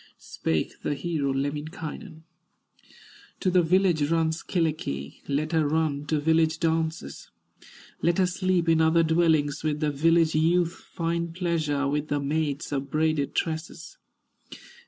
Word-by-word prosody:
Spake 80 -1 -3
the 145 - -1
hero, 145 -2 -1
Lemminkainen: 155 +5 -5 1.2
"To 185 - +1
the 180 0 +5
village 170 -3 +2
runs 160 -1 +1
Kyllikki; 155 - -2
Let 150 +3 -1
her 160 -3 +2
run 150 -2 0
to 155 -1 +1
village 160 +1 +2
dances, 160 - -2 0.7
Let 170 0 +2
her 190 - +4
sleep 180 -1 0
in 165 -1 +4
other 160 +1 +4
dwellings, 160 -3 +2
With 150 -1 -1
the 150 -1 0
village 165 +2 +3
youth 170 +2 +2
find 170 -1 -4
pleasure, 155 -6 0
With 150 +1 -1
the 145 -1 0
maids 145 0 -2
of 140 -1 -3
braided 155 -2 0
tresses." 160 0 -4
160 Hz, 135 wpm, -26 LUFS, 145-165 Hz, 1.2 s, the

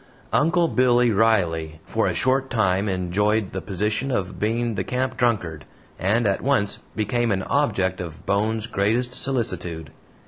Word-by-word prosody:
"Uncle 170 +2 +3
Billy" 125 -3 +3
Riley 85 -8 +1
for - - 0
a - - -1
short 135 +1 +1
time 100 -3 +1
enjoyed 95 +3 0
the 95 - -4
position 105 +7 -2
of 100 -7 -2
being 115 +2 0
the 95 -2 -2
camp 130 +4 -2
drunkard, 85 -11 0 0.4
and 110 +6 +2
at 100 -1 +1
once 130 -7 0 0.2
became 115 +2 0
an 95 -1 0
object 95 -10 0
of 80 -4 -8
Bones' 110 +2 0
greatest 115 +3 0
solicitude. 90 - -2
105 Hz, 145 wpm, -23 LUFS, 95-120 Hz, 0.4 s, Uncle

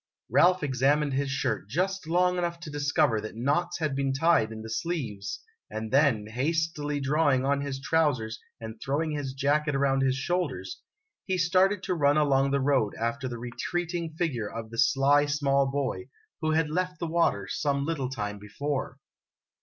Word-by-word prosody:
o - - -66 0.3
Ralph 180 -1 +5
examined 140 +2 +2
his 140 +1 0
shirt 110 -6 -2
just 185 - -1
long 180 +2 +2
enough 170 -1 -2
to 155 - -7
discover 145 -5 +1
that 110 - -7
knots 145 +9 0
had 155 -5 -1
been 135 0 0
tied 135 -6 +3
in 110 0 -7
the - - -7
sleeves 120 - -3 0.3
and 110 0 -5
then, 135 -6 +3
hastily 150 +4 -1
drawing 140 -1 +2
on 140 0 +1
his 140 -1 -4
trousers 135 -7 0 0.2
and 110 -1 -8
throwing 155 +4 -1
his 145 -3 -3
jacket 145 +2 +1
around 135 -1 +2
his 130 -1 +2
shoulders, 135 - -2 0.5
he 190 -1 0
started 185 +3 +3
to - - -1
run 145 -3 +3
along 140 -2 +3
the 140 0 +1
road 130 -6 +1
after 115 +4 -2
the 120 -2 -5
retreating 165 +7 -3
figure 130 -12 -1
of 115 -1 -7
the 115 - -6
sly 145 +1 +4
small 140 -2 +2
boy, 140 - -2 0.3
who 155 - 0
had 160 -1 +1
left 180 +2 -1
the 170 - -3
water 160 - +1
some 140 +3 -1
little 145 -5 -2
time 105 -5 -4
before. 135 +7 -4
140 Hz, 175 wpm, -28 LUFS, 130-160 Hz, 0.5 s, Ralph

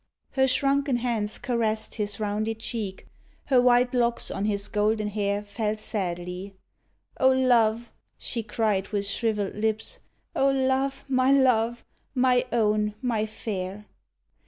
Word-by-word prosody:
Her 265 -1 +3
shrunken 275 0 +2
hands 230 -4 -1
caressed 220 -4 -1
his 210 -1 -3
rounded 215 +1 -1
cheek, 210 -5 -4 0.4
Her 260 -3 +4
white 245 0 +4
locks 240 -1 +1
on 200 - -2
his 200 -1 0
golden 210 0 +1
hair 205 0 -1
Fell 210 +1 -2
sadly. 185 -2 -4 0.6
"O 260 - +6
love!" 240 -3 +3 0.3
she 235 - -4
cried 210 -3 0
with 200 -1 -2
shriveled 205 -1 -1
lips, 220 - -2 0.4
"O 275 - +3
love, 265 0 0
my 260 0 +3
love, 240 -4 +3 0.3
my 250 -1 +3
own, 210 -2 +1
my 225 -3 0
fair! 205 -2 -5
220 Hz, 130 wpm, -26 LUFS, 210-250 Hz, 0.6 s, O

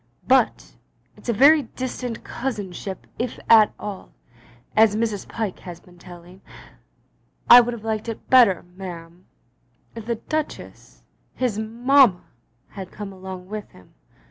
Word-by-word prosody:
But 260 -3 +1 0.4
it's - - -10
a - - +4
very 285 +7 +6
distant 250 -2 -6
cousinship 200 -6 -6
if 240 0 -3
at 220 -2 +6
all, 205 -2 -8 0.6
as 215 -1 +5
Mrs. 215 -3 -2
Pyke 220 -5 -4
has 175 -2 -10
been 175 -1 -20
telling. 175 +1 -14 1.1
I 245 +1 +10
would 240 0 -3
have 220 - -12
liked 220 0 -3
it 225 - -8
better, 235 -9 +5
ma'am, 175 -2 -10 0.7
if 225 -1 -9
the 235 - 0
Duchess, 310 +6 -6 0.3
his 240 -5 -1
mamma, 235 -2 +3 0.5
had 190 -2 -9
come 200 -1 -8
along 185 -1 -9
with 210 +1 -7
him. 90 - -19
215 Hz, 135 wpm, -22 LUFS, 185-240 Hz, 1.1 s, I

